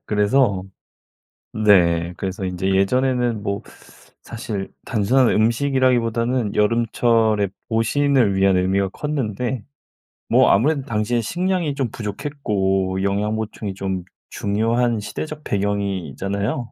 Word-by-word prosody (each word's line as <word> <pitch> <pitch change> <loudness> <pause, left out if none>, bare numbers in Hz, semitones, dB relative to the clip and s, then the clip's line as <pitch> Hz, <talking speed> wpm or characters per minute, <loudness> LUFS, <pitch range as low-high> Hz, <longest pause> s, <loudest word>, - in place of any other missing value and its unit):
그래서 105 -1 +2 0.9
네. 90 -5 +3
그래서 95 +1 -4
인제 95 +1 -2
예전에는 120 +2 +1
뭐 100 0 -3 0.6
사실 110 -4 -5
단순한 120 +4 +2
음식이라기보다는 120 -1 +1
여름철에 110 -1 +2 0.2
보신을 115 -1 +2
위한 95 -1 +3
의미가 95 +1 +1
컸는데. 125 -5 -3 0.7
뭐 - - +5
아무래도 140 +7 +2
당시에는 115 -1 -1
식량이 175 - -1
좀 135 -4 -2
부족했고 100 -5 -2
영양 100 +2 0
보충이 110 -2 -4
좀 95 -1 -3 0.3
중요한 115 +3 0
시대적 150 +8 -6
배경이잖아요. 100 - -2
110 Hz, 275 characters per minute, -21 LUFS, 100-125 Hz, 0.9 s, 뭐